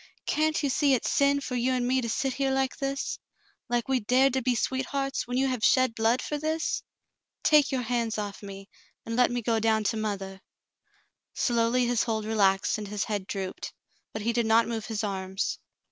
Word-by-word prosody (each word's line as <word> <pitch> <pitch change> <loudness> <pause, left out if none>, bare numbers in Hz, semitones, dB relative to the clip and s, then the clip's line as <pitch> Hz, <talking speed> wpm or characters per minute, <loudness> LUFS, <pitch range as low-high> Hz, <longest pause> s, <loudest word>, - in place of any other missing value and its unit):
"Can't 310 0 +1
you 285 - +1
see 280 0 +3
it's 245 - -1
sin 280 0 +3
for 265 - -5
you 250 +1 +1
and 245 -1 0
me 260 +1 +2
to 235 - -3
sit 270 +3 -1
here 275 0 0
like 265 0 0
this 275 0 -3 0.2
— - - -38
like 240 -1 0
we 265 -1 +2
dared 255 +4 +3
to 265 - +1
be 250 0 +1
sweethearts, 270 +2 -2
when 245 +1 -2
j^ou 270 +1 +2
have 255 -4 -2
shed 255 -3 +4
blood 230 +2 +1
for 295 - -3
this 315 +2 -1 0.6
.^ - - -44
Take 295 -2 +5
your 260 -2 -1
hands 235 -2 -1
off 205 -1 -5
me, 195 -1 -9 0.4
and 230 - -3
let 250 0 +4
me 245 -1 -2
go 225 0 +1
down 220 -1 +2
to 210 +2 0
mothah." 195 -3 -4 0.9
Slowly 240 +1 +2
his 240 -1 +1
hold 220 -3 -2
relaxed 200 -2 +2
and 210 - -6
his 205 -1 -2
head 205 -3 -3
drooped, 190 -2 -5 0.4
but 215 - -5
he 235 +2 0
did 235 -1 +1
not 225 +1 +4
move 225 -2 -4
his 220 -1 -3
arms. 190 -1 -2
235 Hz, 210 wpm, -27 LUFS, 215-265 Hz, 0.9 s, Take